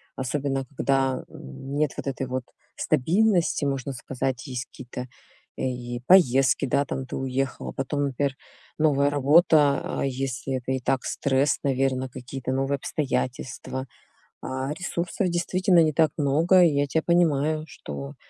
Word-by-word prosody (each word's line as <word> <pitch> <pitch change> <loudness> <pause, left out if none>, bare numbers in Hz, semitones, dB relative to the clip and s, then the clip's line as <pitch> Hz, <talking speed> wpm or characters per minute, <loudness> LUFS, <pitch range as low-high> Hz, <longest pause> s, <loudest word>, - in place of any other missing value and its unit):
особенно 135 0 -2
когда, 135 -1 +1
м, 100 - -8
нет 150 -2 +1
вот - - -5
этой 135 -1 -3
вот 130 0 -3 0.3
стабильности, 170 - +2
можно 135 -1 -2
сказать, 130 0 -3
есть 125 -1 -5
какие-то 125 0 -8 0.5
и 120 -1 -3
поездки, 135 -7 +5
да, 140 +3 +2
там 130 -1 -4
ты - - -6
уехал, 130 0 -2
а - - -7
потом, 145 +2 -2
например, 140 0 -1 0.4
новая 145 -2 +3
работа. 145 0 +4 0.2
А, - - +1
если 135 0 -2
это 130 +1 -4
и 130 - 0
так 130 +2 0
стресс, 140 +1 +1
наверно, 130 -1 0
какие 130 +2 -8
то 130 - -2
новые 135 +1 0
обстоятельства. 130 -1 -3 0.5
А, 130 +2 -3
ресурсов 175 +2 -2
действительно 175 +1 +2
не 155 -1 +1
так 160 0 +3
много, 160 +6 +4
и 170 - +6
я 140 0 +1
тя 160 +4 +1
понимаю, 155 -3 +2
что 70 - -8
135 Hz, 150 wpm, -25 LUFS, 130-150 Hz, 0.5 s, и